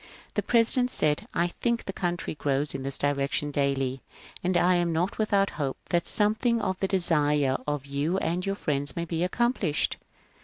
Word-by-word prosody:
The - - 0
President 245 +1 +2
said, 150 -11 +1
" - - -34
I 170 - +2
think 235 +5 -2
the 195 - -4
country 175 -2 -2
grows 145 -1 -1
in 135 - -4
this 135 0 -1
direction 145 +1 0
daily, 135 -2 0 0.4
and 180 0 +2
I 180 +1 +4
am 175 -1 +1
not 175 +6 -1
without 200 -2 +2
hope 135 -2 -2
that 170 -1 +1
something 220 +3 +2
of 190 -4 -1
the 195 - 0
desire 150 -7 +3
of 145 -2 -2
you 140 +6 -1
and 180 -1 -1
your 195 0 -1
friends 145 -6 -1
may 170 - -2
be 165 0 -2
accomplished. 195 - 0
170 Hz, 185 wpm, -27 LUFS, 145-195 Hz, 0.4 s, I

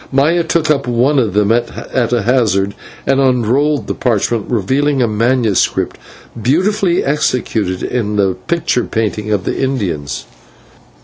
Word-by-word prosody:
Maya 155 +6 +2
took 165 -1 +1
up 140 -3 0
one 125 +4 +2
of 110 -6 0
them 105 0 +3
at 120 +1 -1
a 120 -4 +1
hazard 100 -5 +1 0.3
and 135 0 +2
unrolled 135 +3 +2
the - - -2
parchment, 115 -2 -1
revealing 135 +6 +1
a 120 - +3
manuscript 115 -1 +1 0.5
beautifully 180 - +1
executed 120 -9 -1
in 105 -4 -2
the 100 -2 +2
picture 165 -7 0
painting 105 -1 -2
of 100 -3 0
the - - -2
Indians. 90 - -2
120 Hz, 135 wpm, -15 LUFS, 105-140 Hz, 0.5 s, them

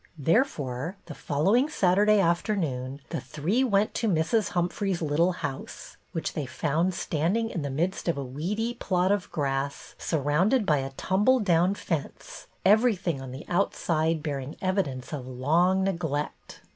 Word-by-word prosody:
There 165 - +4
fore, 145 - -5
the 160 - -8
following 195 - +1
Saturday 205 -3 +3
afternoon 165 - 0
the - - -3
three 155 - 0
went 210 -4 +2
to 230 - -1
Mrs. 185 +4 +1
Humphrey's 180 +1 -1
little 160 +3 +2
house, 145 -6 -6 0.2
which 165 -3 -3
they 150 -4 -3
found 160 +8 0
standing 190 +11 0
in 170 - -3
the 140 - -3
midst 170 +9 -2
of 170 - +1
a 140 - -2
weedy 195 - -2
i^lot 185 0 +1
of 205 -2 -1
grass, 140 -2 -2
surrounded 165 - +1
by 150 -5 +3
a 135 0 -3
tumble 205 - +2
down 180 -2 +3
fence, 165 -7 -5 0.2
everything 195 - +3
on 135 - -7
the 130 +4 -8
outside 165 -3 0
bear 145 -3 -2
ing 135 +3 -7
evidence 175 -10 -2
of 130 -4 -5
long 165 +9 +2
neglect. 160 -6 -3
170 Hz, 155 wpm, -27 LUFS, 145-195 Hz, 0.2 s, There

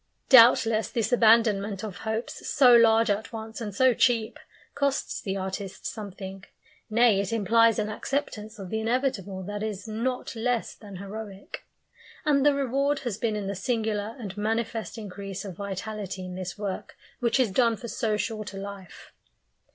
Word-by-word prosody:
Doubtless 230 -3 +6
this 230 -2 -1
abandonment 215 -4 +4
of 210 -4 -6
hopes 220 +2 -4
so 255 -3 +6
large 230 -1 +5
at 205 +2 -2
once 225 +1 -7
and 210 -2 -4
so 255 +5 +4
cheap 235 +3 +1 0.3
costs 280 -1 -1
the 195 -2 -3
artist 190 0 -5
something; 195 -3 -6 0.5
nay, 225 -2 +4
it 200 0 -2
implies 230 +1 +4
an 215 -1 0
acceptance 215 -2 -4
of 195 -3 -8
the 220 - -1
inevitable 220 -5 -1
that 205 +2 -5
is 215 -1 -4
not 235 +3 -3
less 235 +1 -1
than 205 -3 -12
heroic. 200 +1 -8 0.6
And 285 -3 +3
the 290 -1 +4
reward 275 +1 0
has 225 -5 -4
been 225 -2 0
in 210 -1 -3
the 200 - -2
singular 215 +1 -2
and 205 -7 -7
manifest 225 +2 -2
increase 200 -1 -6
of 190 -3 -7
vitality 200 0 -5
in 180 - -7
this 185 +1 -6
work 200 -2 -5 0.2
which 240 +2 +1
is 245 -6 +2
done 230 +1 +3
for 235 - -8
so 215 -2 -1
short 215 -2 -4
a - - -7
life. 195 -2 -9
220 Hz, 165 wpm, -27 LUFS, 200-235 Hz, 0.6 s, Doubtless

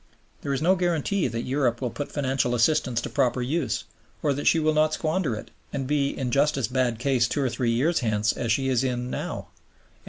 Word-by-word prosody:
There 140 - -3
is 135 +2 -1
no 180 +3 +5
guarantee 175 0 0
that 115 0 -3
Europe 125 -3 0
will 125 -3 -2
put 145 - -5
financial 130 -4 0
assistance 120 -1 +2
to - - -5
proper 130 -2 +1
use, 135 +4 -1 0.4
or 145 - +2
that 145 +2 -3
she - - +5
will 155 -1 +2
not 155 0 +3
squander 155 -6 -1
it 105 - -9 0.2
and 135 -1 -3
be 140 0 +1
in 130 -3 -3
just 145 +2 +2
as 130 -6 0
bad 125 -3 0
case 125 -1 +2
two 140 +4 -1
or 130 - +1
three 120 -1 -1
years 135 +9 +2
hence 105 -3 +1
as 115 -2 -2
she 135 +3 +1
is 130 -1 +2
in 125 -1 -2
now; - - -4
M. - - -31
135 Hz, 225 wpm, -25 LUFS, 120-150 Hz, 0.4 s, no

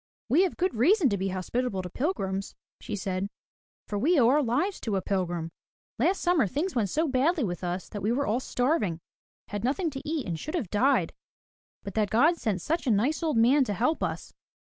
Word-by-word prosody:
"We 295 +9 +5
have 365 - -4
good 370 +1 0
reason 295 - +4
to 200 - 0
be 190 - -1
hospitable 190 +2 -2
to 180 - -6
pilgrims," 195 - -2 0.2
she 215 - -5
said. 190 -1 -2 0.6
"For 205 - -3
we 315 - +3
owe 235 -2 +5
our 295 +3 +4
lives 290 - 0
to 215 -4 -2
a 190 - 0
pilgrim. 175 -4 -2 0.5
Last 350 +10 +2
summer 345 - +3
things 310 - -2
went 220 -6 0
so 315 - +1
badly 285 +4 +2
with 180 -3 -3
us 180 +1 -3
that 205 - -6
we 215 - +1
were 280 +4 +1
all 225 +4 +1
starving, 245 - 0 0.3
— - - -82
had 205 0 -4
nothing 300 +7 0
to 270 -1 -6
eat 310 -2 -2
and 165 -4 -3
should 310 - -5
have 245 - -3
died, 260 +7 +2 0.7
but 200 - -6
that 215 -2 +1
God 310 - +4
sent 200 - -2
such 325 -2 -1
a - - +4
nice 245 - +1
old 315 -7 0
man 260 +5 +5
to 205 - -2
help 250 - 0
us. - - -3
245 Hz, 215 wpm, -27 LUFS, 200-305 Hz, 0.7 s, We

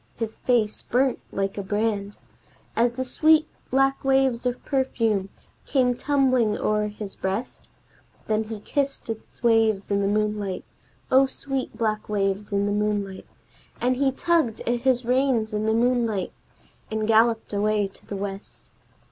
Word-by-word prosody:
His 225 -1 -5
face 225 -4 +1
burnt 260 +1 +1
like 195 +1 -2
a - - -1
brand 205 0 -1 0.6
As 235 +1 +2
the 260 +1 -3
sweet 310 +4 +4 0.2
black 270 +1 +2
waves 265 -3 +2
of 245 0 -4
perfume 225 -7 0 0.4
came 255 -3 +3
tumbling 255 -5 +2
o'er 210 0 +1
his 210 -1 -6
breast, 195 +6 -4 0.6
Then 220 0 0
he 220 -1 -6
kissed 275 -2 -2
its 220 +2 -10
waves 225 -4 +3
in 200 0 +2
the 195 - +1
moonlight 210 -2 -1 0.5
(O 270 +1 +6
sweet 265 -3 -4
black 215 -2 -1
waves 200 0 -1
in 200 0 +1
the 205 - 0
moonlight!), 205 -2 -1 0.5
And 250 +1 +1
he 275 0 +2
tugged 310 -6 +1
at 240 0 0
his 250 -1 +1
reins 250 -3 +1
in 210 +1 -1
the - - +3
moonlight, 230 -4 +1 0.6
and 220 0 -2
galloped 225 0 +3
away 210 0 +1
to - - -16
the 205 - -5
west. 195 0 -7
225 Hz, 150 wpm, -25 LUFS, 210-255 Hz, 0.6 s, O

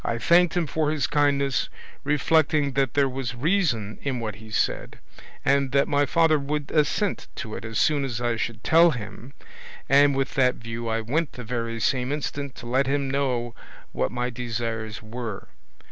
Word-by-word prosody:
I 115 - -1
thanked 175 +7 +4
him 175 - +2
for 155 0 0
his 150 -4 0
kindness, 140 -2 +1 0.3
reflecting 150 0 +2
that 135 -2 0
there 140 -1 +4
was 130 -2 -4
reason 125 - 0
in 135 -3 -2
what 110 -5 -4
he 110 +1 -12
said, 110 - -1 0.5
and 140 -1 +2
that 140 0 +3
my 145 0 +2
father 160 0 +3
would 145 0 -3
assent 160 +7 0
to 110 - -6
it - - -6
as 110 -1 -4
soon 145 -2 +2
as 125 -4 -3
I 120 -1 0
should 110 -1 -4
tell 165 +2 +6
him, 120 -1 -7 0.5
and 140 +1 +5
with 135 -1 -1
that 125 -2 +3
view 115 0 -6
I 115 0 0
went 145 +7 -1
the 125 - -8
very 115 0 -3
same 125 +2 0
instant 145 -2 -4
to 125 - -10
let 130 +3 +1
him 140 -1 0
know 125 -4 -1 0.4
what 65 - -1
my 125 0 -2
desires 115 -3 -4
were. 110 -2 -6
135 Hz, 180 wpm, -25 LUFS, 115-145 Hz, 0.5 s, tell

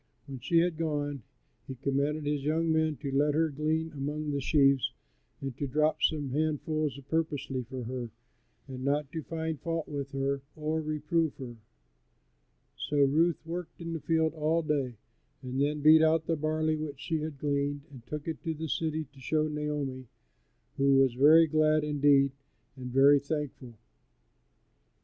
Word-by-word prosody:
When 135 -2 -8
she 165 +8 +1
had 165 -1 +2
gone 145 -4 -2 0.5
he 130 - -6
commanded 140 +3 -1
his 145 -1 -1
young 160 +2 +1
men 160 -1 +2
to 140 - -2
let 145 +2 +2
her 160 0 +2
glean 155 +2 -1
among 150 +1 -3
the 140 -1 -1
sheaves 140 -2 +3 0.5
and 135 -3 -4
to 140 - -1
drop 150 +4 +1
some 145 -4 +1
handfuls 155 0 -1
purposely 150 -5 -1
for 130 -2 -5
her, 120 0 -5 0.6
and 130 -1 -7
not 140 +1 0
to 160 - -4
find 160 -1 -4
fault 165 -1 -2
with 140 -2 -4
her 135 0 -1
or 155 +1 -1
reprove 155 +1 -1
her. 125 -3 -8 1.2
So 145 - -3
Ruth 160 +4 +2
worked 170 +1 -6
in 165 -1 -5
the 165 - -3
field 160 +1 +1
all 160 +1 +1
day, 140 -5 -1 0.5
and 130 +1 -2
then 150 +1 0
beat 155 +2 +7
out 160 0 +3
the 165 - 0
barley 155 +1 0
which 150 -3 -5
she 160 +2 -2
had 155 -1 -5
gleaned 145 0 -1
and 130 -4 -12
took 150 +2 -5
it 160 -2 -4
to 165 -2 -2
the 160 +1 -5
city 160 +1 -1
to 135 - -16
show 155 +4 0
Naomi, 150 -4 -3 0.7
who 140 0 +4
was 135 -2 +4
very 155 +6 +7
glad, 155 0 +2
indeed, 145 -2 +3 0.4
and 130 -2 -7
very 140 +2 +6
thankful. 140 -4 -5
150 Hz, 165 wpm, -29 LUFS, 140-155 Hz, 1.2 s, beat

